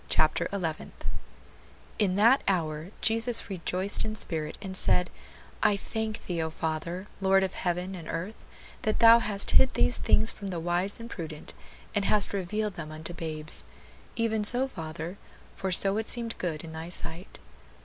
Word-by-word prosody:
CHAPTER 155 - +2
ELEVENTH 170 -6 -4 0.9
"In 195 -4 +2
that 230 +7 +5
hour 160 -3 0
Jesus 230 0 +3
rejoiced 185 +2 -1
in 215 0 -3
spirit, 155 -7 -4
and 190 -2 -6
said, 180 -1 +2 0.5
I 205 - +4
thank 220 +1 -3
thee, 170 -2 -1
O 160 - -1
Father, 160 +4 -3
Lord 195 0 +4
of 190 - -1
heaven 180 +1 -2
and 170 -4 -8
earth, 180 +7 -5 0.4
that 215 - 0
thou 230 0 +8
hast 205 -3 -1
hid 265 - +6
these 245 - +3
things 220 +1 +5
from 200 - -8
the 180 -3 -3
wise 175 +5 -1
and 230 - -7
prudent, 160 -9 -7 0.4
and 200 -1 0
hast 205 -1 +3
revealed 205 +2 -1
them 155 -2 -6
unto 160 +2 -6
babes; 155 -2 -2 0.5
even 220 -2 +1
so, 245 +5 +3
Father; 165 -2 -6 0.4
for 190 -1 -2
so 195 +2 +4
it 220 - -2
seemed 235 -2 -1
good 160 -4 -2
in 165 - -8
thy 160 +1 -6
sight." 175 +1 -6
190 Hz, 165 wpm, -28 LUFS, 165-215 Hz, 0.9 s, thou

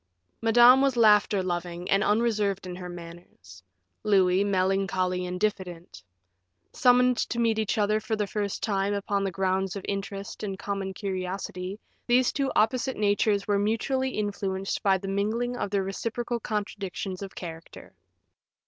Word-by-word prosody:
Madame 240 +3 +7
was 270 -3 +2
laughter 210 -3 +4
loving 175 0 -4
and 195 +1 +4
unreserved 210 -3 +1
in 180 -1 -6
her 180 0 -7
manners; 170 - -12 0.4
Louis, 190 -2 +3
melancholy 185 -2 0
and 180 0 -4
diffident. 180 - -3 0.7
Summoned 250 0 +4
to - - -3
meet 225 -2 +2
each 215 -1 -1
other 215 0 +2
for 220 +1 -2
the 210 -1 -1
first 200 -1 -3
time 200 -1 0
upon 200 0 -1
the 195 - 0
grounds 190 +1 -1
of 200 - -6
interest 200 0 -5
and 195 -2 -4
common 195 -1 -4
curiosity, 185 0 -4 0.3
these 250 +1 +4
two 275 -2 0
opposite 250 +4 +1
natures 205 0 +1
were 205 -1 +2
mutually 245 +6 0
influenced 195 -4 -3
by 195 -1 +3
the 195 +1 -7
mingling 220 +5 -1
of 225 - -3
their 195 -1 0
reciprocal 230 +5 -3
contradictions 200 -3 -4
of 195 -1 -7
character. 165 -2 -9
200 Hz, 150 wpm, -27 LUFS, 190-220 Hz, 0.7 s, Madame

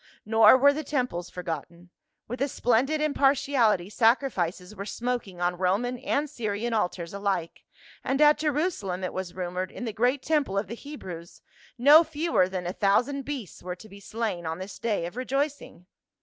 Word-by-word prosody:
Nor 220 +2 +7
were 285 +2 +5
the 310 +2 -4
temples 250 - -2
forgotten; 170 0 -7 0.4
with 245 +3 -6
a 275 - +2
splendid 265 +4 +1
impartiality 270 -9 +2
sacrifices 215 -5 +1
were 200 - -5
smoking 230 -4 -4
on 175 0 -1
Roman 220 +7 0
and 290 +5 -1
Syrian 230 -4 -3
altars 180 -5 -2
alike, 195 -4 -3 0.4
and 270 - 0
at 300 0 +6
Jerusalem, 295 - -1
it 185 - -3
was 185 -2 -5
rumored, 180 0 -3
in 245 - -6
the 225 - -3
great 245 +5 +1
temple 295 -11 0
of 200 - 0
the 200 - -7
Hebrews, 185 - -9 0.3
no 290 +6 +8
fewer 315 - +1
than 185 -2 -4
a 175 - -3
thousand 250 +9 +1
beasts 270 - -6
were 180 0 -5
to 215 - -14
be 200 -1 -13
slain 200 -5 -3
on 160 0 -3
this 185 +1 -8
day 210 -7 -1
of 175 - -7
rejoicing. 275 - -3
220 Hz, 170 wpm, -27 LUFS, 185-275 Hz, 0.4 s, no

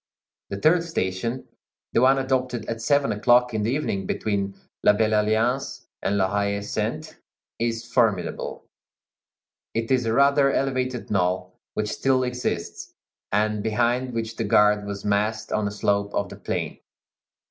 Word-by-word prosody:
The 100 - -4
third 165 - +4
station, 115 - -3 0.5
the - - +3
one 135 +1 +5
adopted 130 -3 -1
at 115 0 -4
seven 140 +1 +2
o'clock 120 +3 +3
in 110 - 0
the 105 - 0
evening, 110 -8 -1
between 100 -2 -1 0.3
La - - +6
Belle 110 +1 +1
Alliance 115 +6 0 0.2
and 100 - 0
La 95 -1 +3
Haie 100 0 -1
Sainte, 100 - -3 0.4
is 115 0 -1
formidable; 110 -7 0 1.1
it 115 +2 -1
is 125 -3 +2
a 110 - +1
rather 140 +2 +4
elevated 130 -4 -1
knoll, 90 -1 0 0.2
which 105 0 -1
still 130 +3 +1
exists, 125 -9 -4 0.4
and 105 +1 +1
behind 120 +4 0
which 115 0 -3
the 115 - -1
guard 105 0 +3
was 100 -1 -5
massed 105 +2 0
on 105 -1 0
a - - -3
slope 100 0 0
of 100 -2 -1
the - - -9
plain. - - -3
110 Hz, 150 wpm, -24 LUFS, 100-125 Hz, 1.1 s, La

